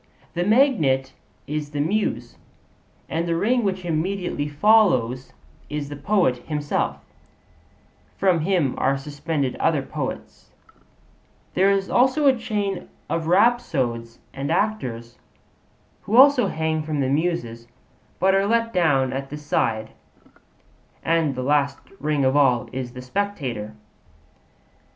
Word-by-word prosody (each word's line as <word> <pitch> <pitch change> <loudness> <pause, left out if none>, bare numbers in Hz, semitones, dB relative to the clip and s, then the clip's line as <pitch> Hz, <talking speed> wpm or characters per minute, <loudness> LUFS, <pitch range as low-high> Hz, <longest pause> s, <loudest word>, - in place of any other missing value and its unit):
The 175 - -1
magnet 180 - +2 0.3
is 150 0 -4
the 145 -1 -5
Muse, 200 +9 -1 0.7
and 165 +1 -2
the 165 - 0
ring 235 +8 +1
which 190 -3 -2
immediately 170 -2 -2
follows 145 - +3 0.4
is 145 -1 -4
the 145 - -6
poet 175 -5 +1
himself; 145 +2 -2 1.2
from 185 -3 +3
him 160 -5 +1
are 135 +1 +2
suspended 145 -1 -3
other - - +1
poets; - - -6 1.0
there 190 +2 +3
is 195 -1 +1
also 260 +4 +2
a 270 -2 +6
chain 205 -5 -3 0.2
of 165 -1 -1
rhapsodes 160 - +1 0.2
and 140 +3 -4
actors, 130 - -2 0.8
who 215 - -2
also 265 0 +7
hang 160 0 -1
from 155 -1 -3
the 135 - +1
Muses, 135 -6 -2 0.5
but 190 +1 +3
are 195 +1 +2
let 230 +1 +1
down 140 -8 +2
at 135 +1 -4
the 150 - -6
side; 110 -7 -1 1.1
and 165 -4 +1
the 130 - -3
last 140 0 +1 0.2
ring 150 -2 0
of 130 +1 +2
all 130 -5 +3
is 125 -2 -5
the 125 - -8
spectator. 125 - -3
155 Hz, 125 wpm, -23 LUFS, 135-195 Hz, 1.2 s, also